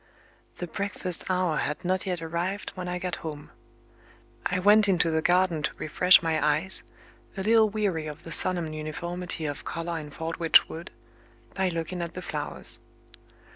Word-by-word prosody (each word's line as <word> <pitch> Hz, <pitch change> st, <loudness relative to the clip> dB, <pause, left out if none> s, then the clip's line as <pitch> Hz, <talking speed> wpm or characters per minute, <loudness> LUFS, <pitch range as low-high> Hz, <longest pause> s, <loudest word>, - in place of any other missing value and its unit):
The 175 Hz, -, -3 dB
breakfast 185 Hz, 0 st, -1 dB
hour 180 Hz, -4 st, +1 dB
had 150 Hz, +5 st, -2 dB
not 185 Hz, +1 st, 0 dB
yet 180 Hz, -3 st, -2 dB
arrived 170 Hz, +5 st, -3 dB
when 180 Hz, -1 st, -6 dB
I 180 Hz, 0 st, -2 dB
got 180 Hz, -1 st, -3 dB
home. 150 Hz, -2 st, -7 dB, 1.0 s
I 180 Hz, -, -1 dB
went 205 Hz, +2 st, +5 dB
into 170 Hz, -3 st, +3 dB
the 160 Hz, 0 st, +1 dB
garden 180 Hz, -2 st, +2 dB
to -, -, -1 dB
refresh 180 Hz, +4 st, +5 dB
my 160 Hz, -1 st, +1 dB
eyes 155 Hz, +6 st, +1 dB, 0.6 s
a 190 Hz, -, -2 dB
little 220 Hz, +1 st, +5 dB
weary 200 Hz, -7 st, -1 dB
of 150 Hz, +2 st, -8 dB
the 165 Hz, -, -8 dB
solemn 170 Hz, -3 st, 0 dB
uniformity 170 Hz, +2 st, -4 dB
of 145 Hz, -2 st, -4 dB
color 165 Hz, 0 st, -3 dB
in 150 Hz, -1 st, -8 dB
Fordwitch 165 Hz, +2 st, +3 dB
Wood 165 Hz, +2 st, -8 dB, 0.6 s
by 190 Hz, -1 st, +1 dB
looking 170 Hz, +1 st, -3 dB
at 170 Hz, 0 st, -5 dB
the 185 Hz, -, -6 dB
flowers. 150 Hz, -3 st, -3 dB
175 Hz, 165 wpm, -27 LUFS, 160-185 Hz, 1.0 s, went